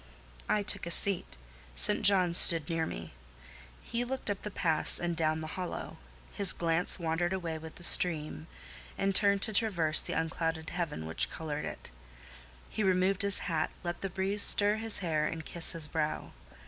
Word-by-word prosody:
I 210 - 0
took 200 -2 -4
a - - -4
seat: 175 - -1 0.4
St. - - +3
John 185 -4 +2
stood 165 -3 +6
near 165 -1 -2
me. 80 -5 -9 0.7
He 235 +1 -4
looked 255 -3 -4
up 200 - -6
the 210 - -6
pass 165 -5 +2
and 175 -1 -3
down 155 -1 0
the 155 - -7
hollow; 180 -1 -7 0.4
his 200 -2 +1
glance 165 +1 -1
wandered 175 +1 -2
away 170 -4 -5
with 160 0 -12
the 175 - -12
stream, 155 -3 +5 0.5
and 195 - -1
returned 200 0 +2
to 220 - +4
traverse 175 -8 +3
the - - -6
unclouded 165 0 -4
heaven 165 - -5
which 80 +1 -2
coloured 150 -2 -6
it: - - -10 0.8
he - - -6
removed 190 0 0
his 200 -1 0
hat, 160 -3 -2
let 175 -1 -6
the 195 - -4
breeze 195 +3 -3
stir 205 +1 +6
his 225 -1 -3
hair 155 -2 -1
and 160 -1 -7
kiss 170 -1 -1
his 165 -3 -3
brow. 155 0 -4
175 Hz, 175 wpm, -29 LUFS, 160-195 Hz, 0.8 s, stood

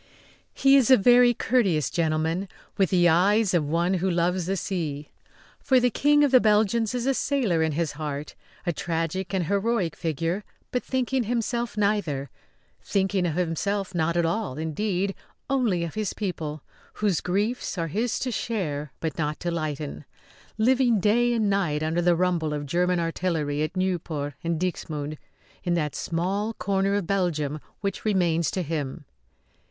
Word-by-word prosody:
He 275 0 +5
is 265 -3 +3
a 260 - +8
very 245 +4 +6
courteous 190 - +1
gentleman, 165 +3 0 0.3
with 195 -4 +2
the 175 -2 +4
eyes 195 +5 +3
of 170 -3 +3
one 170 +3 +1
who 190 +1 0
loves 175 0 0
the 195 +1 0
sea, 155 -7 -3 0.5
for 260 -1 +3
the 245 0 +2
King 295 +5 +4
of 285 - +3
the 255 -2 +7
Belgians 220 +2 +2
is 245 -1 -2
a 270 - +3
sailor 245 - +1
in 160 -1 +1
his 160 0 -1
heart; 145 -1 -5 0.3
a 175 - 0
tragic 165 +3 -2
and 190 -3 0
heroic 200 -2 0
figure 165 +5 -2 0.3
but 250 - 0
thinking 260 -1 0
himself 235 0 -2
neither 180 - 0 0.5
thinking 190 -2 +1
of 155 - -2
himself 185 +3 -1
not 170 0 0
at 170 - +2
all, 170 -5 -2
indeed; 185 +5 -1 0.4
only 230 -11 +1
of 165 - -4
his 215 -3 -2
people, 155 -7 -4 0.3
whose 200 -6 0
griefs 205 +4 -1
are 165 - 0
his 225 +8 -1
to 255 - -2
share 150 - -3
but 160 0 -3
not 150 -1 -1
to 175 - -1
lighten; 155 -3 -4 0.5
living 245 0 +3
day 235 +5 +3
and 225 -3 +1
night 175 -7 0
under 160 +2 0
the 175 0 +3
rumble 170 -3 0
of 145 0 -4
German 180 +4 +1
artillery 165 -3 -1
at 155 +4 -2
Nieuport 165 -6 -2
and 165 -1 -1
Dixmude 155 -4 -3 0.4
in 175 -2 +1
that 150 -4 -1
small 195 +6 -2
corner 195 +1 0
of 205 -3 -1
Belgium 155 -6 -1 0.2
which 200 -1 -3
remains 175 -6 +2
to 185 - -2
him. 150 -1 -4
180 Hz, 165 wpm, -25 LUFS, 160-210 Hz, 0.5 s, a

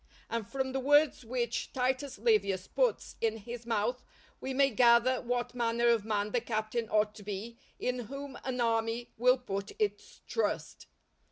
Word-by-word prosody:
And 230 -3 -2
from 265 -1 -2
the 265 - -1
words 290 +1 +4
which 240 0 -2
Titus 260 +2 -1
Livius 200 - +2
puts - - 0
in 225 -1 +1
his 235 +2 -8
mouth 235 +3 0 0.4
we 265 - -4
may 275 +1 +3
gather 240 +2 +5
what 245 0 -2
manner 235 0 +2
of 230 -3 +3
man 210 -1 0
the 245 - +1
captain 220 0 -2
ought 210 0 +2
to 215 - -12
be 210 +4 -6 0.2
in 250 0 -1
whom 275 +4 -7
an 255 -1 -3
army 230 0 0
will 250 +2 +5
put 200 -5 -5
its 425 -1 -2
trust. 455 - -2
240 Hz, 165 wpm, -31 LUFS, 225-255 Hz, 0.4 s, gather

